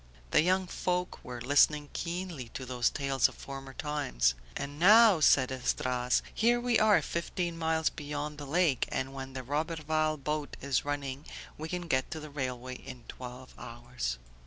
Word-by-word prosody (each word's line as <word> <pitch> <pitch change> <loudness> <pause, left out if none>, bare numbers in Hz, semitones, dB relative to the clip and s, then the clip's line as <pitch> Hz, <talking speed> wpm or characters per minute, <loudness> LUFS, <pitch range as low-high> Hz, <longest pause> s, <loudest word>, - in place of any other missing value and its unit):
The - - +6
young 185 +3 +2
folk 180 0 -2
were 125 -1 -7
listening 145 +3 +3
keenly 170 -7 -4
to 130 - -4
these 125 -2 +1
tales 135 -2 +1
of - - -14
former 135 -1 -8
times. 60 - 0 0.2
"And 145 +1 -5
now," 210 +1 +7
said 130 -3 +5
Esdras, 125 -1 0
"here 240 +2 +3
we 240 -1 +2
are 215 -1 +5
fifteen 170 0 -2
miles 160 -1 +1
beyond 150 0 -5
the 145 - -7
lake, 160 -3 +2
and 135 +1 -2
when 135 -1 -7
the 130 -1 -5
Roberval 155 +2 0
boat 150 +1 -3
is 140 -1 0
running 145 0 -4 0.3
we 155 +1 -6
can 180 0 -4
get 130 -4 +1
to 160 - -5
the 155 -1 -9
railway 130 -2 -4
in 125 -2 -10
twelve 125 +1 -9
hours." 120 - -5
145 Hz, 165 wpm, -30 LUFS, 130-160 Hz, 0.3 s, now